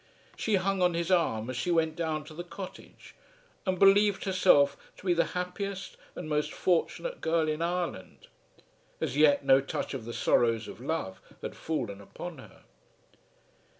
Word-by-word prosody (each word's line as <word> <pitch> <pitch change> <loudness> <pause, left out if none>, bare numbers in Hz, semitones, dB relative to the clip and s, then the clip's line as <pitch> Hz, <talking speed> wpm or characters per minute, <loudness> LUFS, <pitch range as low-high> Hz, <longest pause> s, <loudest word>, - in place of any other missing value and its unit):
She 220 - 0
hung 195 0 0
on 180 -1 +3
his 170 +2 -1
arm 120 -11 +2
as - - -6
she 125 +8 -2
went 160 -2 +2
down 160 -2 -2
to 155 - -11
the 175 +3 -6
cottage, 185 +1 -10 0.5
and 185 0 +1
believed 200 +1 +5
herself 180 -7 +4 0.2
to - - -14
be 180 - +4
the 170 - +3
happiest 190 +2 -4 0.2
and 175 - -6
most 150 -1 0
fortunate 340 - -1
girl 160 -1 +1
in 155 +1 -1
Ireland. 170 - -3 0.7
As - - -2
yet 145 -1 +4
no 135 0 +6
touch 135 - -4
of 130 -5 -5
the 120 - -5
sorrows 115 -2 +2
of - - -10
love 135 -9 -3 0.2
had - - -5
fallen 115 -11 -3
upon 160 - -8
her. - - -15
165 Hz, 165 wpm, -29 LUFS, 140-180 Hz, 0.7 s, no